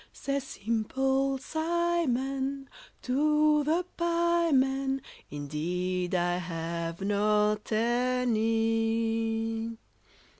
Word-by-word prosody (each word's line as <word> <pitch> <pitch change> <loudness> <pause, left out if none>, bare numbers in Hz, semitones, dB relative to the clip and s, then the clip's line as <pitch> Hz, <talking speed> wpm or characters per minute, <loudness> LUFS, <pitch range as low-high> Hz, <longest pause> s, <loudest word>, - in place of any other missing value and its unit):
Says 275 -1 -3
Simple 265 +5 0
Simon 275 -4 -1 0.4
to 300 +3 +3
the 330 +4 +1
pieman, 330 -6 +2 0.3
"Indeed, 175 +5 -2
I 175 0 +1
have 170 0 -4
not 210 +1 +1
any." 225 -1 0
230 Hz, 65 wpm, -29 LUFS, 210-275 Hz, 0.4 s, to